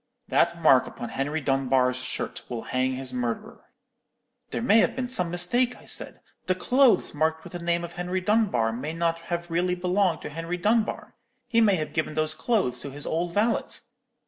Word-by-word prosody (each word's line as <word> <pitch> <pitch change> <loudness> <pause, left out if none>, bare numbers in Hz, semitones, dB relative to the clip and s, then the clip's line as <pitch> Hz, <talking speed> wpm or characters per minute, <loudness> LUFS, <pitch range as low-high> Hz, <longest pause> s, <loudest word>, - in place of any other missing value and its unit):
That 170 0 +2
mark 135 -6 +5
upon 120 - -7
Henry 145 +4 -2
Dunbar's 130 -2 +2
shirt 130 0 -4
will 120 -2 -4
hang 130 0 -1
his 130 -1 -4
murderer.' 120 -2 -4 0.8
"'There - - -3
may 225 -2 +5
have - - +2
been 255 -1 -2
some 180 -9 0
mistake,' 240 +9 +1
I - - -17
said; - - -3 0.3
'the 185 - +2
clothes 255 +6 +3
marked 160 +1 0
with - - -11
the 175 - -4
name 170 0 0
of 170 - -7
Henry 180 +1 -2
Dunbar 185 - +1
may 140 +7 -4
not 165 0 0
have 170 0 -2
really 180 +2 +1
belonged 180 0 +1
to - - -5
Henry 165 +3 -4
Dunbar. 215 +4 0 0.4
He 230 -2 +4
may 205 -4 +5
have 155 -3 -3
given 160 -1 -2
those 155 0 +1
clothes 155 - 0
to 140 - -6
his 145 +2 -8
old 170 +2 -2
valet.' 220 +3 +1
170 Hz, 190 wpm, -26 LUFS, 135-185 Hz, 0.8 s, mark